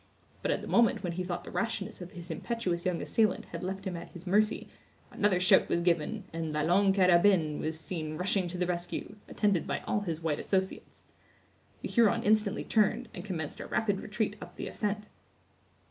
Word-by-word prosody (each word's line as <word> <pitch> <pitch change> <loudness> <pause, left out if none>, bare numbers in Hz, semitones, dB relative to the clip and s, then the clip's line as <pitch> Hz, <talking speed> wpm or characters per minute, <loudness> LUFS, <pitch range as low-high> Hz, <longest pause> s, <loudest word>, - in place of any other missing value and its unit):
But - - -1
at - - +1
the - - -7
moment 230 -3 +3
when 175 - -1
he 180 +2 -3
thought 175 -1 -4
the - - -9
rashness 225 -3 -2
of 180 +2 -8
his 175 -1 -7
impetuous 180 -1 -2
young 180 -2 -1
assailant 215 -3 +1
had 170 - -5
left 190 +2 -4
him 185 -2 -3
at 170 - -8
his 175 0 -10
mercy, 210 +4 +2 0.4
another 200 -3 +2
shout 185 - +5
was 170 - +1
given, 170 -3 +1
and 165 -1 -3
La 150 0 0
Longue 195 +3 +4
Carabine 180 -4 +4
was 160 0 -2
seen 155 -2 -4
rushing 185 +1 +1
to 175 +1 -5
the 180 - +1
rescue, 175 +3 -4
attended 200 -6 +1
by - - -2
all - - 0
his 170 -6 -3
white 160 -3 0
associates. 190 -1 -2 0.8
The - - -3
Huron 235 -1 +3
instantly 215 0 +2
turned, 215 -3 +1
and 175 - -7
commenced 165 -7 -4
a - - -6
rapid 205 -3 0
retreat 215 -1 -2
up - - -10
the - - -5
ascent. 210 0 -2
185 Hz, 195 wpm, -30 LUFS, 170-205 Hz, 0.8 s, shout